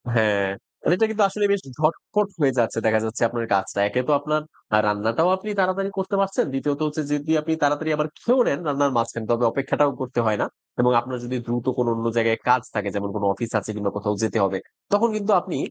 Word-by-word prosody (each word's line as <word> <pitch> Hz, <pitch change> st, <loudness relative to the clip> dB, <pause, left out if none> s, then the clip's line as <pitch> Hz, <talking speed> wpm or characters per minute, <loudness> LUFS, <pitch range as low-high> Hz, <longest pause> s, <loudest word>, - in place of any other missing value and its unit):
হ্যাঁ, 105 Hz, -3 st, +3 dB, 0.5 s
এটা 220 Hz, -, +3 dB
কিন্তু 215 Hz, -1 st, +1 dB
আসলে 205 Hz, +1 st, 0 dB
বেশ 200 Hz, -, +1 dB, 0.2 s
ঝটপট 195 Hz, +6 st, +1 dB
হয়ে 140 Hz, -3 st, +3 dB
যাচ্ছে 115 Hz, -1 st, 0 dB
দেখা 110 Hz, 0 st, +4 dB
যাচ্ছে 110 Hz, +2 st, -5 dB
আপনার 120 Hz, -1 st, -3 dB
কাজটা। 95 Hz, +1 st, 0 dB
একে 125 Hz, +4 st, 0 dB
তো -, -, +2 dB
আপনার 155 Hz, +1 st, -1 dB, 0.3 s
আ -, -, +6 dB
রান্নাটাও 115 Hz, -, +1 dB
আপনি 215 Hz, +3 st, -7 dB
তাড়াতাড়ি 190 Hz, +1 st, +1 dB
করতে 190 Hz, +1 st, -1 dB
পারছেন। 195 Hz, 0 st, +1 dB
দ্বিতীয়ত 145 Hz, +2 st, -1 dB
হচ্ছে 150 Hz, +1 st, -3 dB
যদি 145 Hz, +2 st, -1 dB
আপনি 160 Hz, +1 st, -1 dB
তাড়াতাড়ি 145 Hz, +2 st, +1 dB
আবার 150 Hz, 0 st, 0 dB
খেয়েও 250 Hz, +2 st, +3 dB
নেন 140 Hz, -, +1 dB
রান্নার 140 Hz, -1 st, +2 dB
মাঝ 115 Hz, 0 st, +2 dB
খান। 115 Hz, -, -5 dB
তবে 120 Hz, +1 st, +1 dB
অপেক্ষাটাও 140 Hz, +1 st, +1 dB
করতে 125 Hz, -1 st, -2 dB
হয় 105 Hz, -1 st, +2 dB
না। -, -, +2 dB, 0.4 s
এবং 125 Hz, 0 st, +4 dB
আপনার 125 Hz, +1 st, -6 dB
যদি 125 Hz, +1 st, -3 dB
দ্রুত 120 Hz, 0 st, -2 dB
কোনো 120 Hz, -1 st, +2 dB
অন্য 115 Hz, 0 st, -4 dB
জায়গায় 115 Hz, 0 st, +2 dB
কাজ 125 Hz, 0 st, +5 dB
থাকে 105 Hz, -1 st, -1 dB
যেমন 100 Hz, 0 st, -2 dB
কোনো 100 Hz, -1 st, -1 dB
অফিস 115 Hz, +4 st, -5 dB
আছে 105 Hz, -, -10 dB
কিংবা 100 Hz, -1 st, -2 dB
কোথাও 105 Hz, 0 st, -1 dB
যেতে 110 Hz, -, 0 dB
হবে। 95 Hz, 0 st, -1 dB, 0.4 s
তখন 230 Hz, +3 st, +4 dB
কিন্তু 210 Hz, 0 st, 0 dB
আপনি 180 Hz, -1 st, -5 dB
130 Hz, 220 wpm, -23 LUFS, 110-160 Hz, 0.5 s, আ